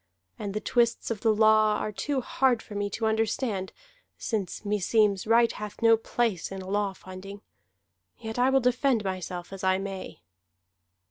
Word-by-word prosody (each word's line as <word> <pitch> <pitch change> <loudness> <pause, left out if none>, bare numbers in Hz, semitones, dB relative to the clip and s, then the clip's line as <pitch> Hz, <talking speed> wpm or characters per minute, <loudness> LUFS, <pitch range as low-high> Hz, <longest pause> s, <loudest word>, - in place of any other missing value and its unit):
And 200 -1 -4
the - - 0
twists 235 +1 +1
of 215 -3 -3
the 225 - +3
law 215 0 +4
are 215 - -3
too 275 +5 -2
hard 250 -1 +1
for 210 - -11
me 205 0 -2
to 220 +3 -3
understand, 220 -2 -1 0.5
since 210 -2 -3
meseems 205 0 +2
right 230 +1 +5
hath 210 -1 -7
no 230 0 +7
place 225 -5 -1
in 190 -1 -6
a - - -10
law 200 0 0
finding. 190 +2 -10 0.7
Yet 220 0 -6
I 250 +1 +4
will 265 0 +3
defend 250 -1 +2
myself 185 -1 -5
as 195 - -8
I 190 0 +3
may." 195 - -7
210 Hz, 165 wpm, -27 LUFS, 195-230 Hz, 0.7 s, no